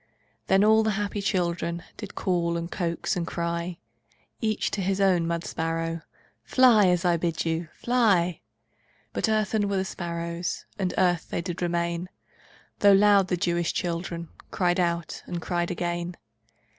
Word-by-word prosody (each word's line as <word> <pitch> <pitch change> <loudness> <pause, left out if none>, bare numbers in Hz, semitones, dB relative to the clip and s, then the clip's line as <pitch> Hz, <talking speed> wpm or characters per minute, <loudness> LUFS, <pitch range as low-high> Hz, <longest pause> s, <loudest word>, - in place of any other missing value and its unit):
Then 195 +1 +4
all 220 +1 +6
the 220 - +1
happy 205 0 -2
children 170 -3 -1
Did - - -8
call, 170 -2 0
and 170 +1 -5
coax, 170 -3 -1
and 170 -2 -2
cry 170 +1 -3 0.6
Each 215 -2 0
to 200 - -2
his 195 +1 0
own 185 -4 +3
mud 170 0 -1
sparrow: 165 0 -2 0.4
"Fly, 235 -6 +5
as 180 0 +2
I 175 -1 +3
bid 165 -1 -1
you! 165 0 -1
Fly!" 200 -9 +2 0.7
But - - 0
earthen 215 -1 +1
were 200 - 0
the 190 - 0
sparrows, 170 -1 -4
And 185 -2 0
earth 175 -2 +2
they - - -2
did 180 0 -5
remain, 170 0 -1 0.7
Though 200 -1 +7
loud 200 -1 +5
the 180 - 0
Jewish 175 -2 0
children 170 -1 -3 0.2
Cried 175 -1 +1
out, 170 -2 -1
and 175 - -3
cried 175 0 -1
again. 175 0 -3
175 Hz, 155 wpm, -26 LUFS, 170-195 Hz, 0.7 s, Though